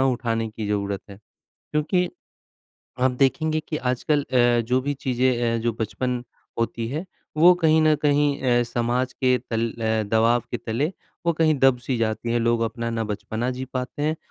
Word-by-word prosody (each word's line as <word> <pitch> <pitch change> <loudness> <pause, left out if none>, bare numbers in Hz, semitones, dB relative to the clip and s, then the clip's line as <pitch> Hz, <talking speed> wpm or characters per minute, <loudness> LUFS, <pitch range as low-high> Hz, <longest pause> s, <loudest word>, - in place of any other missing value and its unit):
उठाने 115 -2 -1
की 110 -1 -5
ज़रूरत 100 -1 -1
है। 100 - -10 0.4
क्योंकि 170 +4 -1 0.9
आप 130 +1 +4
देखेंगे 155 +5 +1
कि 155 - -2
आजकल 135 +2 0
अ, 120 -3 +3
जो 125 +3 +1
भी 145 +2 -2
चीज़ें 125 -3 0
अ, - - -1
जो 120 0 +1
बचपन 125 +3 -2 0.4
होती 115 0 -1
है, 150 +8 -3 0.3
वो 170 +4 +8
कहीं 160 -2 +3
न 155 -1 +5
कहीं 145 -1 +2
अ, 120 -2 +3
समाज 120 +2 -1
के 130 -1 +2
तल 115 0 0
अ, 110 -1 0
दबाव 115 +3 +2
के 120 - -1
तले 120 +9 -2 0.3
वो 170 - +4
कहीं 160 -1 +3
दब 135 -1 +4
सी 130 - 0
जाती 115 +1 -1
है, 120 - +2
लोग 115 0 +1
अपना 115 +1 -2
ना 115 -1 -1
बचपना 110 +3 -3
जी 130 +1 -4
पाते 130 +3 -3
हैं 155 +2 0
125 Hz, 180 wpm, -24 LUFS, 115-145 Hz, 0.9 s, वो